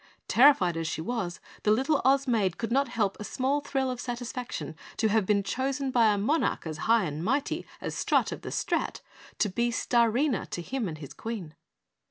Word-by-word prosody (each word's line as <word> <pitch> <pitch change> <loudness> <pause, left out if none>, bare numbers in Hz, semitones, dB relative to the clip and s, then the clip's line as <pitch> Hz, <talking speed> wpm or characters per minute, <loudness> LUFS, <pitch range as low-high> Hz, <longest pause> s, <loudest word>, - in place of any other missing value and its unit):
Terrified 230 - +5
as 165 -1 -2
she 160 - -3
was, 180 -1 -3 0.2
the - - +1
little 270 +7 +3
Oz 270 +2 +3
Maid 205 -7 +1
could 230 0 -3
not 275 +3 +3
help 205 -4 -1
a - - -5
small 265 +6 0
thrill 270 -2 -1
of 250 -1 -5
satisfaction 245 - -5 0.2
to 220 - +2
have 210 -2 +2
been 200 -1 +3
chosen 265 +4 -1
by 230 -4 +5
a 205 - +1
monarch 280 - 0
as 155 -2 -5
High 230 -2 +5
and 155 -1 -3
Mighty 270 +8 -1
as - - -4
Strut - - +1
of - - -6
the - - -6
Strat, - - -1 0.4
to - - +2
be 235 +5 0
Starina 235 - +1
to 175 - -4
him 250 +1 -2
and 155 -3 -5
his 145 -3 -9
Queen. 210 -9 -6
230 Hz, 200 wpm, -28 LUFS, 195-260 Hz, 0.4 s, Terrified